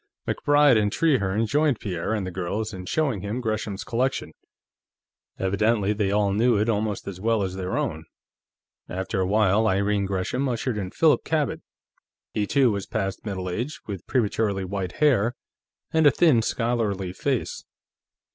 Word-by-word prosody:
MacBride 145 Hz, -4 st, +4 dB
and 105 Hz, -1 st, +1 dB
Trehearne 115 Hz, -8 st, +1 dB
joined 145 Hz, 0 st, +1 dB
Pierre 90 Hz, -3 st, -3 dB
and 105 Hz, -3 st, -2 dB
the 95 Hz, -, -4 dB
girls 100 Hz, +5 st, -3 dB
in 90 Hz, -1 st, -7 dB
showing 140 Hz, -, 0 dB
him 105 Hz, +5 st, -3 dB
Gresham's 110 Hz, -3 st, -3 dB
collection; 130 Hz, +3 st, -1 dB, 1.0 s
evidently 105 Hz, +2 st, +1 dB
they 105 Hz, -2 st, 0 dB
all 100 Hz, -1 st, +2 dB
knew 115 Hz, +2 st, +3 dB
it 105 Hz, +2 st, +1 dB
almost 105 Hz, -1 st, -1 dB
as 95 Hz, -2 st, -6 dB
well 110 Hz, -1 st, +1 dB
as 95 Hz, -1 st, -3 dB
their 95 Hz, -1 st, -3 dB
own. 80 Hz, +1 st, -2 dB, 0.8 s
After 95 Hz, +3 st, -3 dB
a 95 Hz, -, +1 dB
while, 105 Hz, +1 st, +3 dB
Irene 100 Hz, +1 st, +1 dB
Gresham 100 Hz, +8 st, -1 dB
ushered 120 Hz, -2 st, -2 dB
in 95 Hz, -2 st, -4 dB
Philip 155 Hz, -, +3 dB
Cabot. 155 Hz, -3 st, -1 dB, 0.7 s
He, 105 Hz, -1 st, 0 dB
too, 135 Hz, -2 st, +3 dB
was 100 Hz, -2 st, -3 dB
past 95 Hz, 0 st, -3 dB
middle 95 Hz, -2 st, -3 dB
age, 120 Hz, -, -3 dB
with 100 Hz, -4 st, -7 dB
prematurely 105 Hz, -4 st, 0 dB
white 95 Hz, -1 st, -4 dB
hair 125 Hz, -6 st, +2 dB, 0.6 s
and 160 Hz, -2 st, +5 dB
a -, -, +10 dB
thin, 140 Hz, -3 st, +4 dB
scholarly 110 Hz, -6 st, -1 dB
face. -, -, -2 dB
105 Hz, 155 wpm, -25 LUFS, 95-120 Hz, 1.0 s, a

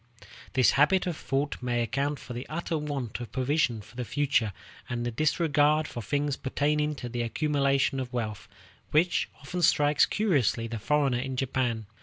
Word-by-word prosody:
This 130 Hz, -2 st, +5 dB
habit 180 Hz, +7 st, +3 dB
of 175 Hz, -3 st, -2 dB
thought 140 Hz, 0 st, -2 dB
may 120 Hz, -1 st, 0 dB
account 140 Hz, +4 st, -1 dB
for 125 Hz, -2 st, -9 dB
the 120 Hz, +2 st, -6 dB
utter 165 Hz, +1 st, -2 dB
want 145 Hz, -7 st, -3 dB
of 120 Hz, -, -7 dB
provision 130 Hz, -3 st, +1 dB
for 110 Hz, +3 st, -17 dB
the 125 Hz, -, -3 dB
future, 135 Hz, -4 st, +1 dB, 0.4 s
and 120 Hz, 0 st, -2 dB
the 120 Hz, -, -1 dB
disregard 150 Hz, +2 st, +2 dB
for 120 Hz, -, -6 dB
things 145 Hz, +6 st, -1 dB
pertaining 150 Hz, +2 st, 0 dB
to 125 Hz, -, -6 dB
the 120 Hz, 0 st, -3 dB
accumulation 140 Hz, +1 st, +1 dB
of 125 Hz, -2 st, -4 dB
wealth, 110 Hz, -5 st, -4 dB, 0.4 s
which 170 Hz, +4 st, +2 dB
often 175 Hz, +6 st, -4 dB
strikes 145 Hz, -2 st, +4 dB
curiously 145 Hz, -, +1 dB
the 115 Hz, -1 st, -4 dB
foreigner 140 Hz, 0 st, +1 dB
in 130 Hz, +1 st, -3 dB
Japan. 125 Hz, -4 st, -1 dB
135 Hz, 170 wpm, -28 LUFS, 120-150 Hz, 0.4 s, This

